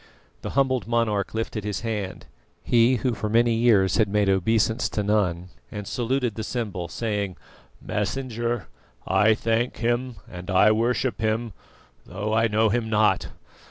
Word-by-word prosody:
The -, -, -5 dB
humbled 130 Hz, -6 st, +2 dB
monarch 110 Hz, -4 st, 0 dB
lifted 110 Hz, -1 st, -3 dB
his 105 Hz, -1 st, -3 dB
hand 105 Hz, -5 st, -4 dB, 0.4 s
he 120 Hz, +2 st, +4 dB
who 125 Hz, +1 st, 0 dB
for 105 Hz, 0 st, -3 dB
many 115 Hz, +1 st, +3 dB
years 105 Hz, -5 st, +3 dB
had 110 Hz, -, +3 dB
made 105 Hz, -1 st, +2 dB
obeisance 110 Hz, +4 st, +1 dB
to 105 Hz, -, -2 dB
none 90 Hz, -4 st, 0 dB, 0.2 s
and 105 Hz, -2 st, -6 dB
saluted 125 Hz, -1 st, -1 dB
the 110 Hz, -, -5 dB
symbol, 105 Hz, -7 st, -3 dB
saying: 100 Hz, -5 st, -3 dB, 0.4 s
"Messenger, 120 Hz, +1 st, -2 dB, 0.4 s
I 105 Hz, +3 st, +4 dB
thank 115 Hz, +2 st, -1 dB
Him 120 Hz, +1 st, -1 dB
and 90 Hz, +1 st, -9 dB
I 95 Hz, +3 st, +5 dB
worship 120 Hz, +3 st, 0 dB
Him, 110 Hz, 0 st, -1 dB, 0.5 s
though 105 Hz, +4 st, -3 dB
I 115 Hz, +1 st, +3 dB
know 110 Hz, 0 st, +2 dB
Him 110 Hz, +1 st, -1 dB
not. 105 Hz, -1 st, +2 dB
110 Hz, 150 wpm, -24 LUFS, 105-120 Hz, 0.5 s, I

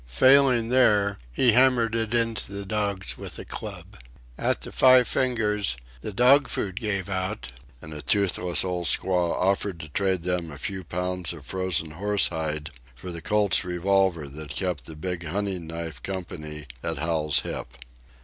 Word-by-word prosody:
Failing 130 Hz, -, +5 dB
there, 105 Hz, -6 st, +3 dB
he 120 Hz, -, +4 dB
hammered 120 Hz, -1 st, +4 dB
it 115 Hz, -1 st, -1 dB
into 115 Hz, -3 st, -1 dB
the 100 Hz, 0 st, -5 dB
dogs 100 Hz, -2 st, -2 dB
with -, -, -7 dB
a -, -, -8 dB
club. -, -, -7 dB, 0.4 s
At -, -, -1 dB
the -, -, -8 dB
Five 130 Hz, -1 st, +6 dB
Fingers 105 Hz, -, +1 dB, 0.2 s
the -, -, -4 dB
dog 125 Hz, +6 st, +5 dB
food 95 Hz, -1 st, -3 dB
gave 100 Hz, -4 st, -2 dB
out, 95 Hz, -, -3 dB, 0.3 s
and 75 Hz, 0 st, -8 dB
a 75 Hz, -, -5 dB
toothless 95 Hz, -2 st, +1 dB
old 90 Hz, -2 st, -1 dB
squaw 90 Hz, +3 st, +1 dB
offered 95 Hz, -1 st, 0 dB
to 75 Hz, -, -9 dB
trade 95 Hz, +1 st, 0 dB
them 90 Hz, -2 st, -1 dB
a 75 Hz, -, -8 dB
few 95 Hz, +3 st, -4 dB
pounds 90 Hz, 0 st, -2 dB
of 75 Hz, -4 st, -11 dB
frozen 95 Hz, -4 st, -1 dB
horse 100 Hz, +5 st, +1 dB
hide 75 Hz, -1 st, -3 dB, 0.2 s
for 90 Hz, +8 st, -7 dB
the 85 Hz, -1 st, -5 dB
Colt's 105 Hz, -1 st, +2 dB
revolver 90 Hz, -2 st, +1 dB
that 75 Hz, +2 st, -8 dB
kept 90 Hz, -10 st, -2 dB
the 80 Hz, -, -8 dB
big 85 Hz, +2 st, -4 dB
hunting 95 Hz, 0 st, -2 dB
knife 80 Hz, -5 st, -6 dB
company 75 Hz, -5 st, -6 dB, 0.2 s
at 80 Hz, -1 st, -2 dB
Hal's 75 Hz, -1 st, +2 dB
hip. -, -, -5 dB
95 Hz, 165 wpm, -26 LUFS, 80-105 Hz, 0.4 s, Five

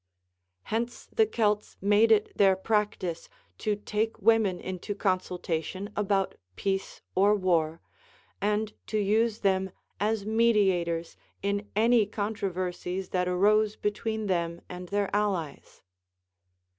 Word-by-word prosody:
Hence 235 Hz, +2 st, -3 dB
the 220 Hz, -, +4 dB
Celts 210 Hz, -2 st, 0 dB
made 205 Hz, +3 st, +4 dB
it 215 Hz, -1 st, +3 dB
their 195 Hz, -2 st, +5 dB
practice 190 Hz, -4 st, -1 dB, 0.3 s
to 210 Hz, -1 st, 0 dB
take 215 Hz, +2 st, -2 dB
women 215 Hz, -4 st, +3 dB
into 185 Hz, +3 st, -5 dB
consultation 185 Hz, 0 st, -2 dB
about 200 Hz, -2 st, +1 dB, 0.2 s
peace 195 Hz, -, -2 dB
or 200 Hz, +2 st, +4 dB
war, 170 Hz, -4 st, +1 dB, 0.6 s
and 210 Hz, +1 st, 0 dB
to 215 Hz, -, -1 dB
use 215 Hz, +2 st, +1 dB
them 190 Hz, -1 st, +2 dB, 0.3 s
as 210 Hz, 0 st, 0 dB
mediators 195 Hz, -7 st, +2 dB, 0.3 s
in 200 Hz, +1 st, -1 dB
any 225 Hz, 0 st, +4 dB
controversies 190 Hz, -3 st, -3 dB
that 180 Hz, -1 st, 0 dB
arose 210 Hz, +4 st, +3 dB
between 220 Hz, +1 st, -2 dB
them 170 Hz, -3 st, -1 dB
and 180 Hz, 0 st, -8 dB
their 200 Hz, 0 st, 0 dB
allies. 190 Hz, -8 st, -2 dB
205 Hz, 115 wpm, -28 LUFS, 185-215 Hz, 0.6 s, their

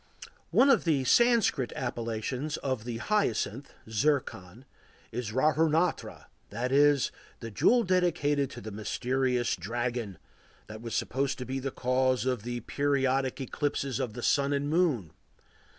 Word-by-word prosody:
One 275 Hz, -, +5 dB
of 235 Hz, -, +3 dB
the 150 Hz, -6 st, +1 dB
Sanskrit 220 Hz, -, +3 dB
appellations 120 Hz, +4 st, -3 dB
of 130 Hz, -5 st, -3 dB
the 120 Hz, -2 st, -4 dB
hyacinth 135 Hz, -, -1 dB, 0.2 s
(zircon) 115 Hz, -3 st, -1 dB, 0.5 s
is 120 Hz, -2 st, -4 dB
râhuratna,—that 155 Hz, -2 st, -1 dB
is, 145 Hz, 0 st, +4 dB, 0.3 s
the 115 Hz, -1 st, -7 dB
jewel 240 Hz, -, +3 dB
dedicated 170 Hz, -, +1 dB
to -, -, -9 dB
the 110 Hz, +2 st, -7 dB
mysterious 125 Hz, +4 st, -1 dB
"dragon," 115 Hz, +1 st, -3 dB, 0.5 s
that 110 Hz, +1 st, -10 dB
was 115 Hz, -2 st, -5 dB
supposed 135 Hz, +1 st, -1 dB
to 125 Hz, -, -5 dB
be 130 Hz, +2 st, -3 dB
the 135 Hz, +1 st, -3 dB
cause 130 Hz, -2 st, 0 dB
of 125 Hz, -4 st, 0 dB
the 120 Hz, +2 st, -4 dB
periodic 135 Hz, 0 st, 0 dB
eclipses 135 Hz, -1 st, -2 dB
of 115 Hz, -, -3 dB
the 120 Hz, +1 st, -7 dB
Sun 140 Hz, 0 st, +2 dB
and 145 Hz, +1 st, -1 dB
Moon. 150 Hz, -, +1 dB
130 Hz, 135 wpm, -29 LUFS, 120-145 Hz, 0.5 s, One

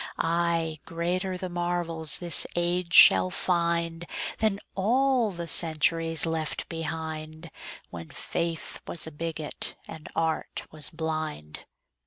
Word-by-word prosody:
Ay, 165 Hz, -1 st, 0 dB
greater 180 Hz, +3 st, -2 dB
the 185 Hz, -, -4 dB
marvels 175 Hz, -3 st, 0 dB
this 175 Hz, -1 st, +1 dB
age 175 Hz, 0 st, 0 dB
shall 95 Hz, -, +8 dB
find 170 Hz, -, 0 dB, 0.3 s
Than 215 Hz, -3 st, +1 dB
all 245 Hz, +3 st, +2 dB
the 170 Hz, -3 st, -6 dB
centuries 165 Hz, 0 st, +3 dB
left 160 Hz, -2 st, -2 dB
behind, 160 Hz, 0 st, -5 dB, 0.4 s
When 85 Hz, -1 st, -8 dB
faith 165 Hz, -1 st, -3 dB
was 170 Hz, -, -2 dB
a 160 Hz, -, -6 dB
bigot 160 Hz, 0 st, -3 dB
and 155 Hz, -, -9 dB
art 160 Hz, -1 st, -1 dB
was 150 Hz, -4 st, -3 dB
blind. 155 Hz, -, -4 dB
165 Hz, 115 wpm, -27 LUFS, 160-175 Hz, 0.4 s, shall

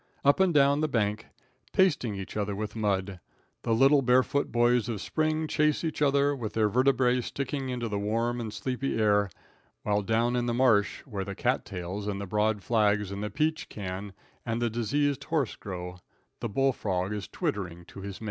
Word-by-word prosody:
Up 140 Hz, +4 st, +5 dB
and 190 Hz, -2 st, +4 dB
down 140 Hz, -1 st, +4 dB
the 155 Hz, -, +2 dB
bank, 105 Hz, -5 st, -1 dB, 0.5 s
pasting 145 Hz, -, +2 dB
each 95 Hz, -1 st, -7 dB
other 105 Hz, -1 st, -1 dB
with 105 Hz, +1 st, -4 dB
mud, 100 Hz, -3 st, -1 dB, 0.4 s
the -, -, -2 dB
little 135 Hz, +5 st, +5 dB
barefoot 130 Hz, +2 st, +2 dB
boys 120 Hz, 0 st, +3 dB
of 110 Hz, -3 st, -2 dB
spring 155 Hz, -, 0 dB
chase 150 Hz, 0 st, +1 dB
each 160 Hz, -2 st, -3 dB
other, 140 Hz, 0 st, +3 dB
with 110 Hz, -5 st, -5 dB
their 110 Hz, -1 st, +3 dB
vertebrae 125 Hz, +1 st, +3 dB
sticking 135 Hz, +1 st, -3 dB
into 120 Hz, -2 st, -2 dB
the 105 Hz, -2 st, -2 dB
warm 115 Hz, +4 st, -1 dB
and 110 Hz, -2 st, -4 dB
sleepy 125 Hz, +5 st, -2 dB
air, 105 Hz, -2 st, +3 dB, 0.5 s
while 105 Hz, 0 st, +1 dB
down 115 Hz, +4 st, +1 dB
in 120 Hz, 0 st, 0 dB
the 120 Hz, -, 0 dB
marsh, 115 Hz, -5 st, +3 dB
where 105 Hz, -8 st, -4 dB
the 100 Hz, +1 st, -6 dB
cat -, -, 0 dB
tails 95 Hz, +2 st, -5 dB
and 100 Hz, -1 st, -2 dB
the 100 Hz, -, -4 dB
broad 105 Hz, +1 st, 0 dB
flags 105 Hz, -3 st, +2 dB
and 100 Hz, 0 st, -4 dB
the 105 Hz, -, -2 dB
peach 155 Hz, +8 st, -1 dB
can 95 Hz, 0 st, -6 dB, 0.3 s
and 115 Hz, -1 st, -2 dB
the 120 Hz, -1 st, 0 dB
deceased 140 Hz, +5 st, 0 dB
horse 150 Hz, -8 st, 0 dB
grow, 90 Hz, -2 st, -7 dB, 0.4 s
the -, -, -3 dB
bull 135 Hz, +6 st, +2 dB
frog 95 Hz, -2 st, -2 dB
is 105 Hz, -1 st, -4 dB
twittering 85 Hz, -4 st, -3 dB
to 100 Hz, -, -11 dB
his 100 Hz, 0 st, -6 dB
mate. -, -, -11 dB
115 Hz, 195 wpm, -28 LUFS, 100-135 Hz, 0.5 s, Up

